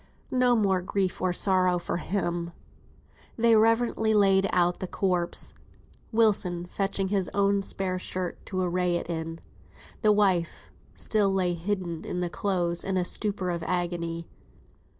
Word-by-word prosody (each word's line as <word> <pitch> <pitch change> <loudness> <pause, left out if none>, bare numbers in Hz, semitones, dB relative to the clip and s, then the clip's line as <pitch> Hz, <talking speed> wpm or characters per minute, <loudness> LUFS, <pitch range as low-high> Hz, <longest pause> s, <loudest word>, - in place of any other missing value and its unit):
No 250 -1 +3
more 195 -4 +2
grief 185 0 -2
or 185 0 +1
sorrow 185 -1 +2
for 175 - -3
him. 175 -2 -2 0.9
They 230 0 +4
reverently 225 0 +3
laid 195 -1 +4
out 175 -1 +2
the 185 - -4
corpse 180 -2 -1 0.6
Wilson 200 -6 +2
fetching 195 +1 -1
his 195 -3 0
only 200 0 +2
spare 190 -1 -2
shirt 180 -1 -4
to 185 -1 -2
array 180 0 0
it 170 0 -3
in. 165 0 -4 0.6
The 215 -2 +5
wife 190 -5 +1 0.2
still 210 -3 +1
lay 185 -2 +1
hidden 175 -2 -3
in 180 - -4
the 175 -1 -2
clothes, 175 -1 -1
in 190 -1 -1
a 180 - +1
stupor 195 -1 -1
of 170 -1 -3
agony. 170 -1 -2
185 Hz, 145 wpm, -27 LUFS, 175-200 Hz, 0.9 s, The